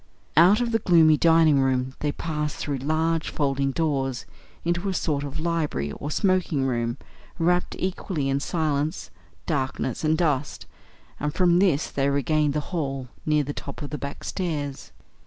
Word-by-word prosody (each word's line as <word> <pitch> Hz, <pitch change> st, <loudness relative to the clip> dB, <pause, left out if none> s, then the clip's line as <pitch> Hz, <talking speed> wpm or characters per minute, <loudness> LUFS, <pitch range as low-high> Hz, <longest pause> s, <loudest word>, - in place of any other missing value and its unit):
Out 180 Hz, +8 st, +6 dB
of 235 Hz, -1 st, 0 dB
the 225 Hz, -, +2 dB
gloomy 165 Hz, -5 st, +5 dB
dining 160 Hz, -2 st, +5 dB
room 130 Hz, -1 st, +1 dB
they 150 Hz, -, 0 dB
passed 150 Hz, -1 st, -3 dB
through 145 Hz, -2 st, -2 dB
large 160 Hz, +3 st, 0 dB
folding 140 Hz, -2 st, 0 dB
doors 135 Hz, -4 st, -1 dB, 0.4 s
into 175 Hz, +3 st, 0 dB
a 190 Hz, -, -2 dB
sort 145 Hz, -5 st, -1 dB
of 145 Hz, +2 st, -5 dB
library 155 Hz, -, -1 dB
or 145 Hz, -, -6 dB
smoking 180 Hz, -5 st, +1 dB
room, 120 Hz, -1 st, -1 dB, 0.4 s
wrapt 175 Hz, +1 st, +1 dB
equally 185 Hz, -5 st, -2 dB
in 135 Hz, 0 st, +1 dB
silence, 155 Hz, 0 st, -1 dB, 0.3 s
darkness, 135 Hz, -4 st, -2 dB
and 155 Hz, 0 st, +2 dB
dust; 150 Hz, -4 st, -1 dB, 0.5 s
and 150 Hz, 0 st, -2 dB
from 175 Hz, -2 st, +4 dB
this 175 Hz, -6 st, +2 dB
they 140 Hz, 0 st, +1 dB
regained 145 Hz, +1 st, +1 dB
the 150 Hz, -, +1 dB
hall 135 Hz, -6 st, -2 dB, 0.2 s
near 150 Hz, -1 st, +3 dB
the 145 Hz, +1 st, -4 dB
top 140 Hz, +1 st, -7 dB
of 145 Hz, -, -6 dB
the 150 Hz, -, -4 dB
back 140 Hz, +1 st, -6 dB
stairs. 150 Hz, -7 st, -4 dB
150 Hz, 160 wpm, -25 LUFS, 140-165 Hz, 0.5 s, Out